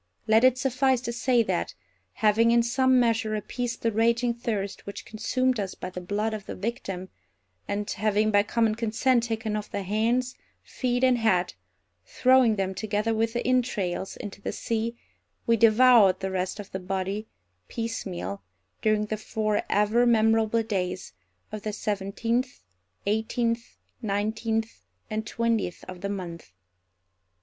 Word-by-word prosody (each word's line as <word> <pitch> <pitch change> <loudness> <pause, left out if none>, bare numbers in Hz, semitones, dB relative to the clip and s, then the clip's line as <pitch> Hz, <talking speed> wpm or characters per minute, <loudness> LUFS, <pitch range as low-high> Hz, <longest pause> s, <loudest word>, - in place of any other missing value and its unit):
Let 220 +2 +4
it 255 0 +5
suffice 260 0 +2
to 235 -2 -4
say 240 0 +2
that, 85 - -2 0.4
having 220 +2 +3
in 235 0 +4
some 260 +2 +3
measure 225 -2 +1
appeased 235 +3 -4
the 230 - +2
raging 235 +2 +2
thirst 215 -5 -4
which 200 - -7
consumed 255 +3 0
us 195 -2 -3
by 185 - -6
the 180 - -6
blood 210 +4 -1
of 215 -2 -6
the - - -5
victim, 195 -3 -4 0.6
and 205 0 -2
having 215 +1 +1
by 205 -1 +5
common 220 +1 +1
consent 235 +2 +1
taken 225 -2 -2
off 210 0 -4
the 200 - -3
hands, 230 +6 0 0.3
feet, 245 -1 -2
and 255 -2 +4
head, 185 -6 +2 0.5
throwing 250 - +4
them 190 -1 -1
together 210 +3 -1
with 225 +1 0
the 240 - -2
entrails, 210 -8 0
into 200 -1 -8
the - - -3
sea, 230 +1 -2 0.5
we 230 - +4
devoured 225 -3 +6
the 190 0 -3
rest 185 +2 -2
of 205 - -8
the 190 - -4
body, 195 +3 -3 0.4
piecemeal, 190 - -4 0.4
during 215 -1 +2
the 215 0 -3
four 215 -1 -1
ever 215 +4 +3
memorable 225 0 +3
days 185 - -3 0.4
of 215 - -5
the 215 - -3
seventeenth, 220 +5 -2 0.4
eighteenth, 230 +3 -1 0.2
nineteenth, 220 +1 -2 0.3
and 215 0 -2
twentieth 230 -6 -1
of 185 -1 -9
the 200 - -3
month. 170 - -6
220 Hz, 150 wpm, -26 LUFS, 200-235 Hz, 0.6 s, devoured